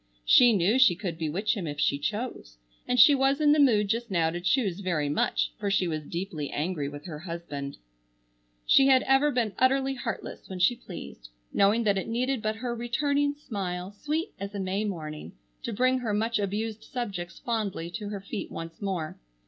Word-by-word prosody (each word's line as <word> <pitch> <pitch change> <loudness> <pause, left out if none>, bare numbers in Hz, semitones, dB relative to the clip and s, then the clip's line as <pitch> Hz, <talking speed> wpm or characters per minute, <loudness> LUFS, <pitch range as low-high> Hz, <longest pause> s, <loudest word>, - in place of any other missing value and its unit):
She 245 - +7
knew 205 +4 +3
she 235 -9 +6
could 175 -3 -5
bewitch 175 +8 0
him 185 -6 -4
if 145 0 -5
she 140 -1 +2
chose, 205 - -4 0.3
and 250 0 +1
she 290 +6 +9
was 270 +1 +2
in 300 -1 +5
the 300 - +4
mood 220 -7 +4
just 230 +3 -1
now 165 -4 +1
to 175 +1 -4
choose 195 -1 +1
very 170 -7 -1
much, - - 0
for 200 - -1
she 195 -2 +2
was 155 -3 -4
deeply 170 -5 -4
angry 150 -2 -2
with 145 +2 -10
her 155 -5 -6
husband. 165 -5 -6 0.9
She 270 - +6
had 260 -1 +5
ever 270 +2 +4
been 240 -6 0
utterly 270 +1 +3
heartless 245 -3 -6
when 190 - -5
she 180 +7 +3
pleased, 170 - -10 0.2
knowing 205 +4 +3
that 200 -3 +2
it - - -5
needed 250 +2 -1
but 215 0 -1
her 240 +2 -3
returning 285 +5 0
smile, 190 -9 -5
sweet 305 - -3
as 200 +1 -6
a - - -3
May 195 +2 -1
morning, 155 -6 -6 0.3
to - - -4
bring 255 +4 +2
her 220 -4 -1
much 225 +1 0
abused 210 +2 -3
subjects 195 -9 -5
fondly 210 -9 -3
to 205 +2 -5
her 205 -2 -5
feet 200 +2 -5
once 165 +3 -8
more. 180 -6 -3
205 Hz, 195 wpm, -27 LUFS, 170-245 Hz, 0.9 s, she